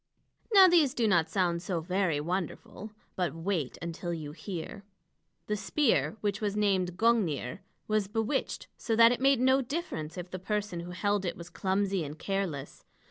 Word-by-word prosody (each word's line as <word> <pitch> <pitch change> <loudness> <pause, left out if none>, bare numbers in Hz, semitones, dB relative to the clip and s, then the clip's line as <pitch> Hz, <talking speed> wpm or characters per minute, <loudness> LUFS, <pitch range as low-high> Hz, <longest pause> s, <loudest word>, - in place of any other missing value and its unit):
Now 390 -3 +9
these 330 -7 +4
do 230 -2 +2
not 175 -5 +3
sound 175 -3 0
so 180 -2 -2
very 180 -2 0
wonderful. 180 +5 -4 0.3
But 175 -6 -1
wait 165 -5 -2
until 170 +1 -4
you 150 -3 -6
hear! 180 +3 -7 0.6
The 210 - -1
spear, 230 0 +1
which 205 0 -1
was 205 -1 -1
named 190 -4 +1
Gungnir, 185 - +1 0.3
was 215 -2 +1
bewitched, 225 +6 -2
so 225 - 0
that 230 +1 +7
it 245 - -1
made 270 -1 +4
no 260 +2 +4
difference 245 - -4
if 180 0 -6
the 185 - -5
person 205 -2 -2
who 170 +1 -7
held 200 +2 0
it 175 - -3
was 170 +1 -10
clumsy 190 +1 0
and 150 +1 -7
careless. 190 -7 -3
195 Hz, 170 wpm, -30 LUFS, 170-220 Hz, 0.6 s, Now